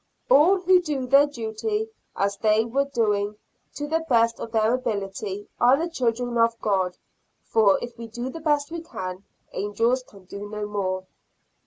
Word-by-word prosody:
All 345 +8 +6
who 365 0 +4
do 295 -6 -2
their 275 +3 +6
duty 295 - -3 0.2
as 200 0 0
they 215 +1 +3
were 270 +4 0
doing, 210 -6 0 0.4
to 290 - -4
the 325 +2 0
best 230 -2 +3
of 225 - -6
their 220 0 +2
ability, 200 -4 -3
are 250 +3 +6
the 330 +3 -1
children 245 -3 -1
of 230 0 +3
God; 190 -3 0 0.5
for, 210 -4 +4
if 240 -1 -7
we 230 - -6
do 240 +3 -5
the 330 - -7
best 295 -1 0
we 335 0 -4
can, 185 - -6 0.3
angels 230 +6 0
can 200 -6 -17
do 200 +2 -8
no 210 0 -4
more. 190 -2 -2
230 Hz, 170 wpm, -25 LUFS, 205-280 Hz, 0.5 s, All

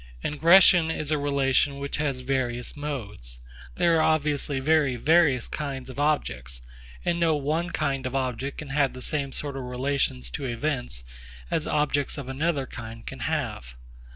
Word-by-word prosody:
Ingression 170 +2 +6
is 155 -2 -2
a 155 - +3
relation 140 -1 +2
which 140 0 -3
has 140 -4 -1
various 125 -2 -2
modes. 110 - -6 0.4
There 170 -1 +3
are - - +3
obviously 150 -3 +1
very 145 -2 +3
various 150 -1 +3
kinds 135 -3 -5
of 130 - -9
objects; 65 - -1 0.4
and 170 0 +1
no 165 -2 +3
one 155 +4 -1
kind 135 -5 -1
of 130 - -5
object 130 +1 -2
can 150 - -7
have 140 -1 +1
the 130 0 -7
same 140 -3 -1
sort 140 0 -4
of 135 - -4
relations 125 - -1
to 135 - -4
events 125 - -2 0.5
as 155 - 0
objects 150 -1 0
of 140 -3 -6
another 145 +1 0
kind 115 -2 -9
can - - -7
have. 60 +1 -3
140 Hz, 160 wpm, -26 LUFS, 125-150 Hz, 0.5 s, Ingression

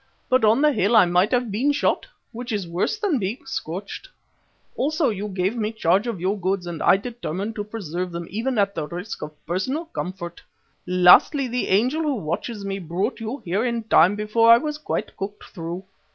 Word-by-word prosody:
But 255 -2 +3
on 220 +6 +4
the 300 - +5
hill 220 -2 +2
I 215 - +7
might 180 +4 +3
have 245 -3 +1
been 250 +9 +2
shot, 285 - 0 0.2
which 240 +1 -6
is 200 -5 -2
worse 175 - -1
than 395 - 0
being 210 +7 -4
scorched. 200 - -6 0.7
Also 305 +3 +1
you 210 -1 -3
gave 190 +2 -1
me 215 -2 -1
charge 200 0 +1
of 225 -6 -3
your 195 +4 -1
goods 185 0 -1
and 170 -2 -5
I 195 - +5
determined 210 -2 -5
to 205 - -2
preserve 185 -4 -5
them 170 0 -5
even 230 +5 -2
at 200 -1 +2
the 155 -4 -3
risk 180 +6 -6
of 150 0 -9
personal 225 - -2
comfort. 180 - -6 0.5
Lastly, 180 - +6
the 245 +1 -2
angel 250 +11 +2
who 300 -3 0
watches 200 +3 -4
me 195 0 -3
brought 175 +5 -2
you 225 +5 -5
here 190 +5 0
in 235 -2 -1
time 190 -3 +5
before 215 +2 +4
I 230 - +9
was 300 +3 -3
quite - - -3
cooked 205 +1 -6
through. 175 +1 -7
205 Hz, 195 wpm, -23 LUFS, 180-240 Hz, 0.7 s, I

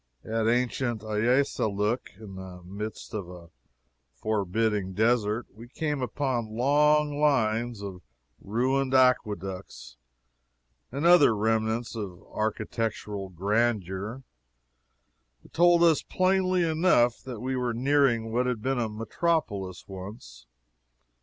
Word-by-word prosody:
At 110 0 0
ancient 120 -1 0
Ayassalook, 110 -1 0
in 105 -3 -10
the 95 -1 -9
midst 105 +4 -7
of 100 -5 -4
a 85 -2 -12 0.6
forbidding 105 - -1
desert, 110 +1 +1
we 115 +4 -12
came 150 +2 -3
upon 125 -4 -2
long 145 +2 +3
lines 115 -6 +1
of 95 -3 -7 0.4
ruined 130 +5 0
aqueducts, 100 - 0 0.9
and 140 +5 -3
other 170 -10 +6
remnants 110 +2 0
of 95 -5 -6
architectural 110 -2 -3
grandeur, 105 +3 -1 1.2
that - - -19
told 175 0 +5
us 165 -3 +5
plainly 185 -1 +1
enough 155 -8 +2
we 130 +1 -3
were 125 -1 -1
nearing 120 -2 +2
what 125 +2 +1
had 120 -4 -2
been 135 -1 0
a 115 -2 -1
metropolis, 110 - -2
once. 95 - -10
115 Hz, 105 wpm, -27 LUFS, 105-130 Hz, 1.2 s, other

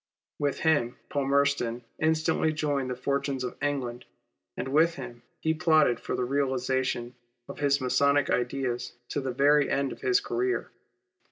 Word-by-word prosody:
With 145 -1 -1
him 145 -6 +2
Palmerston 140 -4 +1 0.2
instantly 160 0 +2
joined 145 -4 -1
the 125 - -2
fortunes 140 +1 -1
of 125 - -4
England, 135 -4 -2 0.5
and - - -3
with 160 +4 +3
him 120 -3 -8 0.2
he 160 - +2
plotted 155 -7 +3
for - - -3
the 125 - -1
realization 130 -2 -1 0.3
of - - -9
his 140 -1 +2
Masonic 140 +2 +2
ideas 125 -1 -1 0.2
to 145 - -2
the 130 - -3
very 145 +3 +4
end 140 -1 0
of - - -9
his 390 0 +3
career. 380 -1 -2
140 Hz, 150 wpm, -28 LUFS, 125-150 Hz, 0.5 s, very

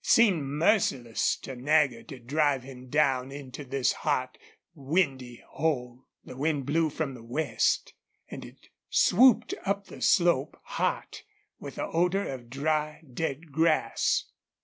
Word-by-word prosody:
It - - -11
seemed 195 -11 +4
merciless 140 - +1
to 135 - -6
Nagger 135 -2 +2
to 140 -4 -10
drive 140 +2 0
him 130 -1 -11
down 135 -2 +1
into 140 0 -8
this 135 -1 0
hot, 130 -4 -1 0.4
windy 135 -5 -1
hole. 130 -5 -3 0.2
The - - -10
wind 145 0 -1
blew 160 +3 +1
from 145 -2 -3
the 125 - -11
west, 125 +7 0 0.3
and - - -8
it - - -15 0.2
swooped 230 +1 +5
up 200 0 -1
the - - -12
slope, 170 -6 +3
hot, - - -3 0.4
with - - -8
the - - -3
odor 180 +4 0
of 125 -3 -7
dry, 150 +3 -1
dead 155 +2 -4
grass. 155 -5 +1
145 Hz, 140 wpm, -28 LUFS, 130-160 Hz, 0.4 s, swooped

